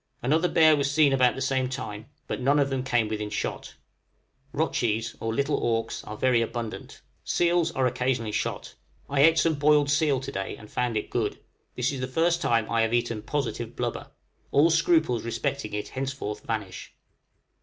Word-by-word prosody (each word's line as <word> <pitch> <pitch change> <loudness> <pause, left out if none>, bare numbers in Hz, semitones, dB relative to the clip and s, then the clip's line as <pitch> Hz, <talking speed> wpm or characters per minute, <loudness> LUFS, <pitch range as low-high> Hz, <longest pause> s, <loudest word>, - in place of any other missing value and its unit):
Another 160 +7 +2
bear 160 -2 +5
was 140 -1 0
seen 145 -1 +4
about 130 -2 +3
the 130 - -5
same 130 -1 0
time, 110 -5 -6 0.2
but - - -4
none 140 +3 +3
of 140 -1 +2
them 130 -1 -1
came 120 -4 +1
within 105 -1 -3
shot. 105 - -4 0.8
Rotchies 115 -7 -1
(or 115 - -2
little 140 +5 0
auks) 115 -1 -1
are 105 - -7
very 125 -1 +3
abundant. 115 -1 -5 0.2
Seals 175 -1 +1
are 135 -3 +1
occasionally 125 -3 0
shot. 105 +1 -3 0.3
I 140 0 +1
ate 165 +2 +6
some 165 0 +3
boiled 145 -1 +3
seal 150 -3 +2
to 130 - -6
day, 95 0 -4
and 105 - -14
found 120 -3 -1
it 105 - -4
good: - - -1 0.4
this 125 +2 0
is 135 - -5
the 130 - -2
first 170 +5 +1
time 115 -7 +1
I 115 -1 +1
have 115 +1 +1
eaten 115 -2 -1
positive 120 -2 -3
blubber; 120 -1 -4 0.4
all 155 +4 +4
scruples 160 -7 +2
respecting 115 0 -3
it 105 - -4
henceforth 130 -6 -4
vanish. 105 -5 -5
130 Hz, 180 wpm, -26 LUFS, 115-145 Hz, 0.8 s, ate